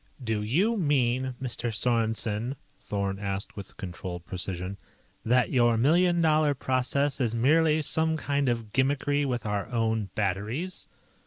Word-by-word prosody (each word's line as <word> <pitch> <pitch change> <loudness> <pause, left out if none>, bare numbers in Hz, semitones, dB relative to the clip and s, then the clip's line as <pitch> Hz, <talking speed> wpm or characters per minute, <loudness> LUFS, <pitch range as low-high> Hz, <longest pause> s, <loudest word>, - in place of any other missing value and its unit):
"Do 110 -3 -1
you 180 - +1
mean, 130 - +1
Mr. 120 -2 -3
Sorensen," 115 +1 0 0.2
Thorn 100 -1 -3
asked 100 +1 -3
with 100 -2 -9
controlled 90 -3 -6
precision, 90 +1 -3 0.5
"that 125 +2 +2
your 120 -2 +4
million 170 +7 +3
dollar 155 -2 +3
process 135 +2 0
is 115 -2 0
merely 155 +5 +3
some 160 +2 0
kind 140 -3 0
of 115 -3 -3
gimmickry 145 +1 +1
with 120 -3 -2
our 105 -1 -1
own 110 -4 0
batteries?" 110 - -2
120 Hz, 135 wpm, -27 LUFS, 105-145 Hz, 0.5 s, your